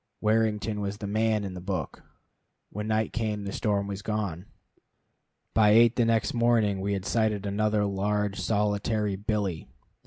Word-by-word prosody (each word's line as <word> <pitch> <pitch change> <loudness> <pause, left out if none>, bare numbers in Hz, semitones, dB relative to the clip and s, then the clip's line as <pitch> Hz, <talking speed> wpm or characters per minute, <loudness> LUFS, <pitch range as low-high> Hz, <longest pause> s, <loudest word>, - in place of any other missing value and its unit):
Warrington 110 -1 +1
was 100 0 -3
the 105 - -6
man 110 +1 +1
in 95 -2 -5
the 90 - -7
book. 90 -5 -4 0.7
When 105 +1 -4
night 110 0 0
came 110 -3 -2
the 100 - -4
storm 100 -2 0
was 100 0 -5
gone. 100 -4 -3 1.1
By 105 -2 +5
eight 115 +1 +6
the 120 - +3
next 115 -1 +1
morning 115 -5 +2
we 100 +1 -1
had 95 -1 -3
sighted 110 -3 0
another 105 +1 +1
large 100 +1 -1
solitary 105 0 0
billy. 100 -4 -2
105 Hz, 155 wpm, -27 LUFS, 100-110 Hz, 1.1 s, eight